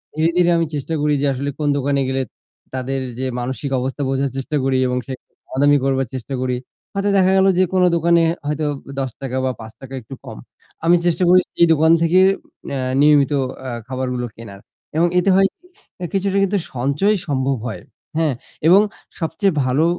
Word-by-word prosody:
ধীরে, 160 +1 +2
ধীরে 175 -1 +4
আমি 165 - +2
চেষ্টা 145 +3 -3
করি 150 0 +2
যে - - +1
আসলে 140 +2 -3
কোন 150 - 0
দোকানে 140 0 0
গেলে 135 0 0 0.5
তাদের 130 +1 -2 0.2
যে 130 - -1
মানসিক 130 +3 -3
অবস্থা 135 +3 -3
বোঝার 135 0 0
চেষ্টা 145 +3 -3
করি 135 -1 +1
এবং 125 - -1
সে 130 - -4 0.3
দামাদামি 145 +2 +3
করবার 135 -2 +1
চেষ্টা 130 +2 -6
করি। 125 -1 -1 0.4
হয়তো 200 +1 0
দেখা 190 0 +4
গেল 190 - +5
যে - - +6
কোন 185 - +3
দোকানে 170 0 +3 0.3
হয়তো 150 +1 -1 0.3
১০ 130 0 -4
বা 130 - +1
৫ 115 +4 -11
একটু 135 +4 -10
কম - - -8 0.5
আমি 175 +1 +6
চেষ্টা 175 +1 +2
করি 185 - +7
সেই 170 - +5
দোকান 160 +1 +4
থেকে 170 +2 +4 0.6
এ - - -1 0.2
নিয়মিত 145 -1 +5 0.4
আ - - -3 0.2
খাবারগুলো 130 -1 -2
কেনার 100 -4 -10 0.4
এবং 170 +2 +4
এতে 185 +2 +1
হয় 195 0 +5
কি, 360 - -29 0.5
কিছুটা 195 0 0
কিন্তু 200 +1 +1 0.2
সঞ্চয় 140 - +1
সম্ভব 135 -1 0
হয় 105 -6 -6 0.4
হ্যাঁ, 160 -3 +2 0.3
এবং 190 +5 +7 0.4
সবচেয়ে 165 +3 0
ভালো 140 +6 +2
145 Hz, 175 wpm, -20 LUFS, 130-170 Hz, 0.6 s, করি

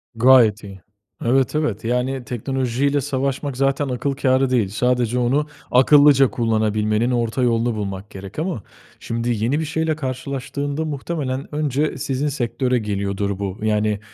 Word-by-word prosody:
Gayet 115 -3 +5
iyi. 95 -2 -10 0.4
Evet, 130 +4 +2
evet 120 -10 -1
yani, 125 +2 -1
teknolojiyle 130 +3 -1
savaşmak 135 0 -2
zaten 135 +1 +1
akıl 130 +3 -1
kârı 135 -1 +2
değil. 115 -6 +1
Sadece 125 +2 0
onu, 135 +5 +1 0.2
akıllıca 140 +1 +6
kullanabilmenin 110 0 +1
orta 120 +1 0
yolunu 115 -1 +1
bulmak 100 -1 -5
gerek 100 +7 -9
ama 165 - -3 0.4
şimdi, 115 +1 -3
yeni 140 +6 +1
bir 160 - -2
şeyle 160 0 -1
karşılaştığında 140 +2 -4
muhtemelen 145 -2 -4
önce 150 0 0
sizin 135 +2 -2
sektöre 125 -2 0
geliyordur, 100 -1 -2
bu 100 -1 -4
yani 105 -1 +1
125 Hz, 135 wpm, -21 LUFS, 110-140 Hz, 0.4 s, akıllıca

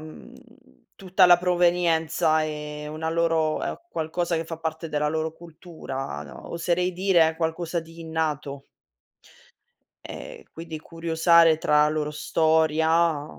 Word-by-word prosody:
mhmm, 155 0 -12 0.6
tutta 185 -1 +3
la 175 0 +7
provenienza 170 -3 +2
è 150 -1 -5
una 155 +2 -4
loro 165 -2 +1
è - - -3
qualcosa 170 +2 -2
che 165 - -2
fa 165 0 -6
parte 160 0 -4
della 150 -1 -1
loro 160 +1 -2
cultura 160 -5 -8
no, - - -11
oserei 175 +2 -1
dire 175 -3 +2
qualcosa 165 +1 -2
di 165 +1 -14
innato. 150 -4 -3 1.4
Ehm, - - -9
quindi 165 -1 -7
curiosare 165 0 +3
tra 150 -1 +3
la - - +2
loro 150 -1 -2
storia 160 0 +2
160 Hz, 125 wpm, -25 LUFS, 155-170 Hz, 1.4 s, la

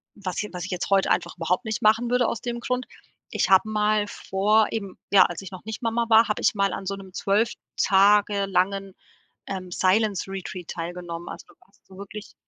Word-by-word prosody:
was 190 -1 -4
j 210 - -6
was 180 0 -5
ich 185 - -7
jetzt 180 +2 -3
heute 195 -1 +3
einfach - - -1
überhaupt 180 +7 0
nicht 220 +1 -3
machen 225 +2 +3
würde 250 -1 +2
aus 230 - -3
dem 240 -1 -4
Grund. 250 +1 -2 0.5
Ich - - +1
habe 195 +3 +5
mal 210 0 +1
vor 210 +2 +1
eben, 200 -4 -5
ja, 200 - +8
als 175 +2 -3
ich 195 - -9
noch 185 - -10
nicht 220 +1 -6
Mama 230 0 0
war, 225 +1 +6
habe 210 - -2
ich - - +3
mal 200 -1 +1
an 195 - -5
so 195 +1 -2
'nem 190 -2 -12
12 210 +5 +1 0.2
Tage 200 +1 +4
langen, 195 0 0 0.5
ähm, 185 -2 -6
Silence 195 +2 +1
Retreat 185 -2 -6
teilgenommen. 170 0 -6
Also, - - -9
du - - -19
warst 195 - -29
so 190 0 -15
wirklich 205 +2 -9
200 Hz, 210 wpm, -25 LUFS, 185-215 Hz, 0.5 s, ja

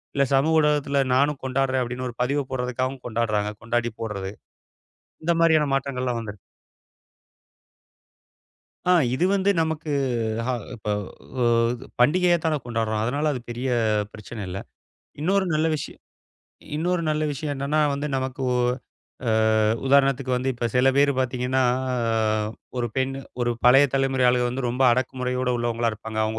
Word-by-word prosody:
இல்ல 140 0 +3
சமூக 155 +4 +3
ஊடகத்துல 145 -2 +2
நானும் 140 +1 +2
கொண்டாடுறேன், 130 0 +1
அப்படின்னு 125 +1 -4
ஒரு 120 - -10
பதிவ 140 +3 0
போடுறதுக்காகவும் 130 +1 -2
கொண்டாடுறாங்க, 110 -3 0
கொண்டாடிப் 120 0 -2
போடுறது. 100 -4 -4 0.9
இந்த 170 +2 +2
மாதிரியான 160 -3 +4
மாற்றங்கள்லாம் 130 -3 -2
வந்திருக் 105 -3 -8 2.5
ஆ, - - +1 0.2
இது 145 +8 +1
வந்து 195 0 +1
நமக்கு 160 -1 -2 0.6
ஹ - - -1 0.3
இப்போ 105 -2 -4 0.5
ஓது 120 +1 +1
பண்டிகையாத்தானே 165 +3 +3
கொண்டாடுறோம், 110 -2 -1
அதனால 145 +6 0
அது 130 - -4
பெரிய 120 +2 -3 0.5
பிரச்சனை 110 +1 -8
இல்ல. 95 +2 -4 0.6
இன்னொரு 190 +4 +2
நல்ல 155 +1 +2
விஷய 145 - -6 0.8
இன்னொரு 175 +2 0
நல்ல 155 0 0
விஷயம் 145 +1 -3
என்னன்னா, 140 +3 -1 0.2
வந்து 140 +2 -3
நமக்கு 130 +1 -4
ஒ - - +2 0.7
அ - - +3 0.6
உதாரணத்துக்கு 135 -1 +3
வந்து 125 +1 -1
இப்ப 120 0 -2
சில 125 +1 +4
பேரு 140 0 +4
பாத்தீங்கன்னா, 130 0 0 0.3
அ - - 0 0.8
ஒரு 120 -1 0
பெண் 130 0 0 0.3
ஒரு 120 0 +1
பழைய 135 +3 +7
தலைமுறை 135 -1 +1
ஆளுக 125 0 +3
வந்து 130 +2 -3
ரொம்ப 125 +2 -1
அடக்குமுறையோட 125 0 -1
உள்ளவங்களா 120 -1 0
இருப்பாங்க. 110 +1 -7
அவங்க 110 +1 -2
130 Hz, 135 wpm, -24 LUFS, 120-145 Hz, 2.5 s, பழைய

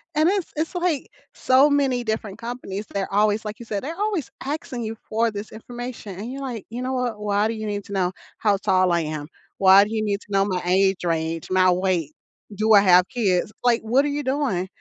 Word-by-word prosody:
and 310 +3 +4
it's 390 -3 -1
it's, 320 +4 -2
like, 345 -6 0 0.3
so 265 +3 +4
many 270 -4 +1
different 220 -3 -3
companies, 230 -4 -6
they're 195 0 -3
always 210 +1 +2
like, 210 0 -6
you 235 - -9
said, 205 -3 -3
they're 320 +5 -4
always 410 - -1
asking 270 -4 -4
you 220 0 -4
for 225 +1 +1
this 205 +1 -7
information 240 -3 -8
and 230 +5 -5
you're 275 - -6
like, 245 -6 -5
"You 240 +3 -5
know 260 +1 -2
what, 245 -4 -2
why 205 0 +1
do 225 - -2
you 215 -1 -5
need 205 0 -3
to 200 - -8
know 185 -2 +1 0.3
how 205 -2 +2
tall 185 -2 +2
I 170 0 +2
am? 155 -2 -4 0.3
Why 195 +1 +7
do 210 - -5
you 215 -1 0
need 205 -1 -1
to - - -18
know 195 0 +3
my 185 -3 -2
age 190 +1 +2
range, 165 -1 -2
my 185 0 +5
weight, 180 -4 0 0.4
do 215 +2 +3
I 200 - +8
have 180 -1 +5
kids? 200 -5 0
Like, 240 -1 +3
what 250 +6 +2
are - - +1
you 290 0 -2
doing? 260 -10 -1
215 Hz, 225 wpm, -23 LUFS, 190-250 Hz, 0.4 s, I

